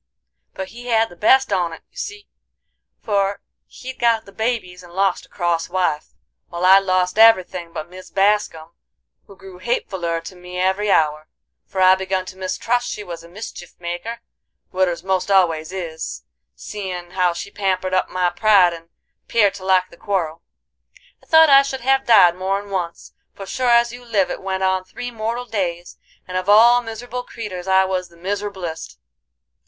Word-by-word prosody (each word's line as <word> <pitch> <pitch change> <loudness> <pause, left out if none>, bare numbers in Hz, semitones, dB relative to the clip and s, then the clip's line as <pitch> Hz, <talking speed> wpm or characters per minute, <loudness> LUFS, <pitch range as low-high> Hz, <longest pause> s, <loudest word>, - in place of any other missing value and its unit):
But 190 0 -5
he 245 +1 -11
had 225 -1 +2
the - - -14
best 260 +5 +4
on't 175 -3 0 0.2
you - - -35
see, 430 -4 -7 0.8
for 200 -1 0 0.3
he'd 260 0 -10
got 230 -2 +2
the 195 - -14
babies 220 -4 -3
and 175 -1 -15
lost 190 +1 0
a - - -38
cross 170 -2 -1
wife, 175 -5 -1 0.3
while 175 +1 -2
I'd 190 +1 +8
lost 185 0 0
every 225 -4 +7
thing 175 -2 -8
but 155 - -6
Mis 185 +1 -12
Bascum, 195 -5 0 0.6
who 200 - -14
grew 190 -2 -13
hatefuler 185 -6 -2
to 185 - -9
me 180 0 -9
every 190 +3 +1
hour, 155 -3 +2 0.4
for 190 - -3
I 185 0 +7
begun 190 0 -1
to 185 - -9
mistrust 210 +6 -1
she 210 - -5
was 170 -3 -8
a 170 - -14
mischief 175 -2 -9
maker,—widders 180 -1 -5
most 190 0 -1
always 165 -5 +2
is,—seein' 180 +1 -7
how 180 -1 +2
she 175 +3 -7
pampered 185 -2 -1
up 185 - +1
my 180 -1 0
pride 190 -2 +4
and 165 0 -11 0.4
'peared 205 -4 +3
to 195 -1 -10
like 185 -1 +2
the 170 - -15
quarrel. 170 -5 -2 0.8
"I - - -25
thought 320 -1 +7
I 275 0 +9
should 275 -1 -4
have 270 +2 +1
died 190 -7 +7
more'n 195 +2 -3
once, 175 -3 -4 0.2
for 195 - -8
sure 250 +5 -1
as 235 0 +4
you 245 0 -10
live 215 -6 0
it - - -5
went 190 0 -3
on 190 0 +1
three 245 +6 -7
mortal 230 +2 -3
days, 180 -6 -4 0.3
and 185 0 -3
of 185 +2 -2
all 235 +4 +7
miser'ble 245 +2 -7
creeters 195 -6 -7
I 190 0 +4
was 185 -1 -2
the 170 - -20
miser'blest. 190 -3 -5
190 Hz, 175 wpm, -20 LUFS, 180-215 Hz, 0.8 s, I